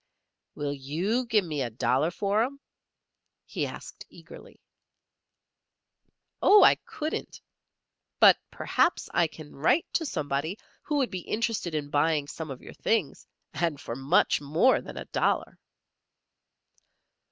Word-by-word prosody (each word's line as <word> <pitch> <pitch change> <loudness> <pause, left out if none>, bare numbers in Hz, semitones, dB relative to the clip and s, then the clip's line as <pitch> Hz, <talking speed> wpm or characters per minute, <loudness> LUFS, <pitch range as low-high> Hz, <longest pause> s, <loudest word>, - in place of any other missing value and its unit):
"Will 145 -1 -3
you 175 - -2
give 215 -5 +2
me 150 -4 -3
a 125 - -1
dollar 125 +6 +1
for 200 +4 0
'em?" 275 +4 -2 0.9
he - - -3
asked, - - -10
eagerly. - - -14 1.8
"Oh, 415 +1 +7
I - - +8
couldn't! 310 +1 -5 0.8
But - - +7
perhaps 350 - 0
I 170 - +3
can 155 -1 -13
write 160 - +2
to 325 - 0
somebody 150 - -2 0.2
who 300 - -3
would 265 -3 0
be 185 - -3
interested 215 -7 -1
in 145 -1 -3
buying 150 0 +1
some 160 +1 -7
of 135 -2 -8
your - - -10
things, 205 -11 -1 0.3
and 165 -4 -1
for 115 -5 -6
much 135 +3 +2
more 160 - +3
than - - -10
a - - -6
dollar." - - -1
160 Hz, 130 wpm, -27 LUFS, 145-220 Hz, 1.8 s, I